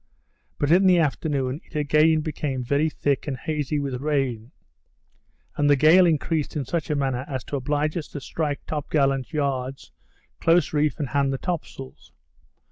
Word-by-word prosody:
But 145 +1 0
in 190 +3 +5
the 180 -1 +6
afternoon, 145 -2 -1
it - - -20
again 150 +2 +3
became 145 -4 -3
very 140 +5 +1
thick 145 -2 -1
and 135 -3 -2
hazy 150 0 -2
with 135 -3 -3
rain; 135 -5 -1 1.0
and 145 0 +2
the 145 - +6
gale 165 +6 +6
increased 160 -1 0
in 145 -3 -2
such 165 +3 -3
a 150 - +1
manner 135 -3 -1
as 130 -3 -4
to - - -5
oblige 145 +3 -1
us 155 - -4
to 145 - -7
strike 145 +1 -3
top 150 -2 -4
gallant 135 -3 +1
yards, 135 -3 -3 0.5
close 170 0 +3
reef 150 -2 +1
and 145 -5 -3
hand 140 -1 +1
the 135 - -2
top 175 +3 -3
sails. 65 0 -12
145 Hz, 175 wpm, -24 LUFS, 135-155 Hz, 1.0 s, the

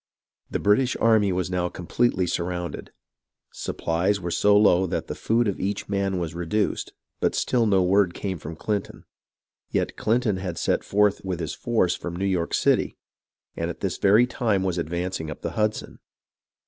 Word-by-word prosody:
The - - -1
British 120 +5 +2
army 110 -3 +4
was 90 0 -1
now 90 -1 0
completely 95 +2 0
surrounded. 90 0 -3 0.6
Supplies 90 +5 -1
were 85 -2 -4
so 105 +4 +4
low 95 -3 +4
that - - -2
the - - -5
food 115 +1 +1
of 100 - -2
each 100 +1 -2
man 100 -1 0
was 85 -2 -3
re 85 0 -5
duced, 105 +3 -1 0.3
but - - +1
still 120 -3 +1
no 95 -3 +3
word 95 -1 +3
came 95 -4 -4
from 80 +2 -7
Clinton. 100 +4 -3 0.7
Yet - - -1
Clinton 110 -3 +1
had 90 -3 -4
set - - 0
forth 105 0 +2
with 95 -3 -3
his 80 - -3
force 110 -7 +1
from 85 -1 -6
New 95 +3 -2
York 90 -4 0
City, - - +1 0.6
and - - -2
at - - -7
this - - -2
very 105 +5 +5
time 110 -6 0
was 90 -2 -1
advancing 85 0 -3
up 75 - -8
the - - -2
Hudson. 110 0 -2
95 Hz, 175 wpm, -25 LUFS, 90-105 Hz, 0.7 s, very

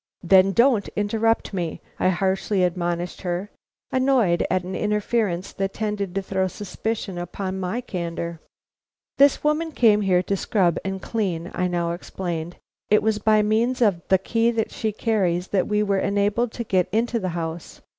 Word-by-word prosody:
"Then 190 +2 +5
don't 235 -1 +3
interrupt 220 +2 0
me," 175 -4 -3 0.2
I - - +3
harshly 190 +1 0
admonished 175 0 -2
her, 180 +2 -3 0.4
annoyed 255 -10 +3
at 185 0 +1
an 185 +1 -5
interference 210 -3 -1
that 195 0 -2
tended 205 -3 -3
to 195 - -1
throw 190 0 0
suspicion 205 0 -4
upon 190 +2 -4
my 190 +6 -2
candor. 170 -6 -4 0.8
"This 280 0 +5
woman 305 +2 +1
came 220 -7 +4
here 185 -2 +2
to 200 - -1
scrub 185 -3 +1
and 190 0 -4
clean," 180 -7 -2
I 180 - 0
now 170 -1 -1
explained; 175 -1 -5 0.3
"it 210 - +4
was 220 -1 +1
by 215 0 +3
means 230 +5 +1
of 200 -8 +2
the 190 - +5
key 230 +5 +1 0.2
she 220 - -2
carried 195 -6 0
that 190 -3 +1
we 210 0 +1
were 200 -2 +1
enabled 205 +4 +1
to 235 - -4
get 185 -4 +1
into 230 +2 +1
the 185 -3 -2
house. 165 0 -5
195 Hz, 165 wpm, -23 LUFS, 180-220 Hz, 0.8 s, Then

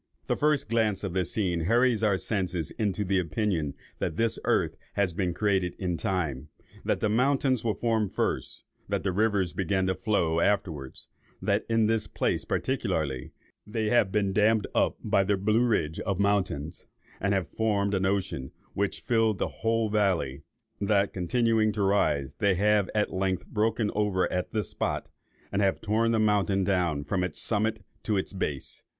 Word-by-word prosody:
The - - 0
first 150 -1 +1
glance 110 -3 +1
of 95 -4 -3
this 90 -2 -1
scene 90 -6 0
hurries 120 +2 +3
our 105 -3 +3
senses 90 -6 -2
into 105 -2 -1
the 95 0 +2
opinion 85 -3 -1 0.2
that - - -2
this 115 +4 0
earth - - +1 0.2
has 100 -4 +1
been 90 0 0
created 95 -1 0
in 90 -2 -1
time; 75 -7 -2 0.3
that - - 0
the - - +2
mountains 130 +2 +2
were 110 -4 0
formed 110 -2 0
first, - - -2 0.3
that - - -1
the 95 - 0
rivers 100 -2 +1
began 95 0 0
to 95 - +1
flow 90 -6 +1
afterwards, 85 -9 -1 0.3
that - - 0
in 115 -1 +3
this 110 -1 +1
place - - -1
particularly 80 - -1 0.4
they 110 0 -1
have 120 -5 +3
been 100 -2 +1
dammed 105 +1 +3
up - - +2
by 95 - +3
the 100 +1 +1
Blue 110 +5 +2
Ridge 80 -9 0
of 100 -3 -2
mountains, 95 -6 0 0.3
and 100 0 +1
have 95 -4 -1
formed 105 -2 0
an 95 -1 +1
ocean 95 -9 -1 0.2
which 100 0 -1
filled 115 -3 +2
the - - 0
whole 115 0 +2
valley; 95 -10 0 0.4
that, 100 -1 +2
continuing 110 +4 +2
to 100 -1 -1
rise, 75 -9 +1
they 100 -2 +3
have 105 +1 +2
at 105 - +1
length 95 -1 -1
broken 110 0 0
over 100 -3 +1
at 90 0 -1
this 110 -2 -2
spot, - - -2 0.4
and 100 - 0
have 95 -1 +2
torn 110 +2 +1
the 115 - +2
mountain 105 -2 +2
down 90 -6 +1
from 90 +4 -1
its 90 -4 -3
summit 110 -1 0 0.2
to 105 -2 0
its 95 - -3
base. 75 -8 -4
100 Hz, 175 wpm, -28 LUFS, 90-110 Hz, 0.4 s, hurries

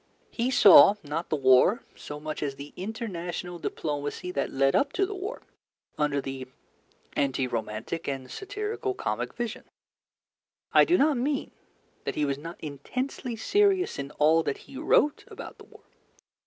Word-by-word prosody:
He 240 +1 -1
saw, 205 -4 +8
not 155 +3 -4
the - - +1
war 135 - +5
so 150 0 -8
much 155 0 -5
as 140 -2 -2
the 140 +1 -10
international 180 -4 -5
diplomacy 145 +4 -3
that 140 -6 -2
led 135 0 +2
up 280 0 +2
to 390 - +2
the 410 - -5
war, 400 +5 -6 0.5
under 150 -1 +1
the 135 -1 -5 0.7
anti 135 -2 +1
romantic 115 +6 -4
and 135 -2 -4
satirical 405 0 -4
comic - - -2
vision. 235 -2 -4 1.1
I - - +7
do 355 +1 +4
not 290 -1 +3
mean 275 +3 -1 0.5
that - - -2
he 150 - +1
was 140 -1 -2
not 165 +3 -8
intensely 240 - -4
serious 385 - +2
in 140 0 -4
all 160 +2 +5
that 285 - -2
he - - -13
wrote 295 0 +2
about - - -10
the - - -13
war. - - -18
170 Hz, 155 wpm, -27 LUFS, -, 1.1 s, saw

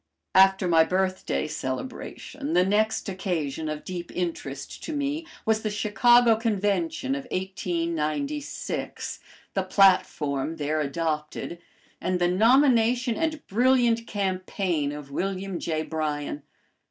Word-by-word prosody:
After 190 0 +5
my 165 -2 +6
birthday 185 0 -1
celebration, 250 - -5
the 180 +1 +4
next 215 +3 +1
occasion 165 -6 -2
of 155 0 -4
deep 175 -2 -5
interest 155 -6 -4
to 320 - -4
me 295 +3 -2 0.2
was 220 0 +2
the 215 - -1
Chicago 230 +3 +4
Convention 230 - 0
of 275 -2 -4
1896, 185 - -3 0.3
the 195 - +1
platform 165 -7 +2
there 155 0 -1
adopted, 155 +2 -3 0.4
and 185 0 0
the 175 0 +2
nomination 240 +4 +4
and 315 -2 -2
brilliant 235 0 +3
campaign 185 -5 -1
of 145 -1 -8
William 190 +3 -2
J. 155 -1 -1
Bryan. 150 -2 -3
190 Hz, 115 wpm, -26 LUFS, 160-230 Hz, 0.4 s, my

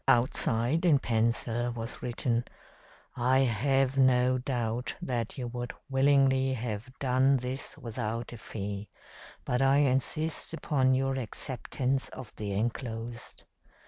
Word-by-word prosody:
Outside, 120 +4 +2
in 165 -5 +5
pencil, 115 0 0
was 115 0 -6
written: 120 -1 0 0.7
'I 125 +2 +3
have 135 +2 +2
no 130 -1 +4
doubt 120 -2 -2
that 120 -3 -3
you 125 - -3
would 120 0 -5 0.2
willingly 135 -1 +4
have 115 -1 -4
done 135 +1 +3
this 130 +1 -4
without 115 0 -4
a - - -7
fee, 100 -1 -5 0.6
but 125 +1 0
I 135 +1 +5
insist 145 +4 +1
upon 130 -5 +2
your 135 0 0
acceptance 130 +2 -2
of 125 -5 -10
the 105 -1 -3
enclosed.' 115 +2 -4
125 Hz, 120 wpm, -29 LUFS, 115-135 Hz, 0.7 s, in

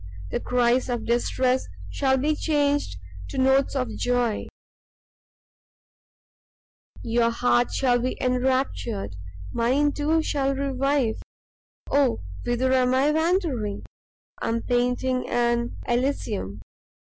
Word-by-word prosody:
The - - -1
cries 250 +1 +1
of 240 -2 -2
distress 250 +2 +1 0.2
shall 265 - +2
be 300 +4 +1
changed 290 - 0 0.3
to - - -6
notes 265 +1 +3
of 255 -2 0
joy: 245 -3 0 2.6
your 230 0 +2
heart 240 +1 +2
shall 245 -2 +2
be 255 +2 -2
enraptured, 250 - -1 0.4
mine, 270 +5 +2
too, 310 +2 +1
shall 275 -2 0
revive 275 -3 0 0.7
oh 275 - +2 0.2
whither 250 +2 +1
am 255 0 +3
I 275 +3 +3
wandering? 315 - 0 0.6
I - - -2
am 230 0 -1
painting 250 +1 0
an 235 0 0
Elysium! 235 - -1
255 Hz, 105 wpm, -25 LUFS, 240-275 Hz, 2.6 s, notes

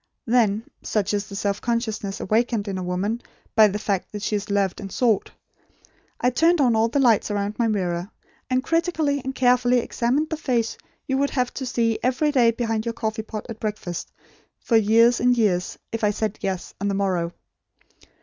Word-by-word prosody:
Then 225 -3 +2 0.2
such 210 -1 -1
is 205 0 -1
the 200 - -8
self 200 0 -1
consciousness 220 -4 -2
awakened 220 0 0
in 190 -2 -3
a - - -4
woman 190 +6 -2 0.3
by 220 -2 +7
the 205 0 -2
fact 200 -3 -2
that 210 -1 -6
she 210 - 0
is 205 0 -3
loved 200 -2 0
and 195 -1 -7
sought 225 -3 +1 0.9
I 250 - +2
turned 330 +6 +3
on 245 -5 +4
all 220 +1 +3
the 235 - -2
lights 235 -6 +4
around 205 +1 -2
my 235 - +3
mirror, 180 -3 -1 0.4
and 255 0 +1
critically 325 -4 0
and 265 0 -4
carefully 250 -1 +3
examined 250 +6 0
the 320 - -1
face 240 -7 0 0.3
you 265 0 0
would 280 0 +2
have 250 -2 -1
to 260 - -4
see 230 -2 0
every 265 +4 +1
day 245 -5 +4
behind 225 -1 -1
your 230 0 -3
coffee 220 -1 -3
pot 215 -1 -7
at 225 -2 -8
breakfast, 210 -5 -4 0.5
for 235 - 0
years 225 +2 +5
and 245 0 +3
years, 185 -6 +1
if 225 -1 -4
I 210 - +4
said 215 0 -2
'Yes,' 190 -2 -3
on 200 - 0
the 200 - 0
morrow. 185 -4 0
225 Hz, 195 wpm, -23 LUFS, 205-245 Hz, 0.9 s, by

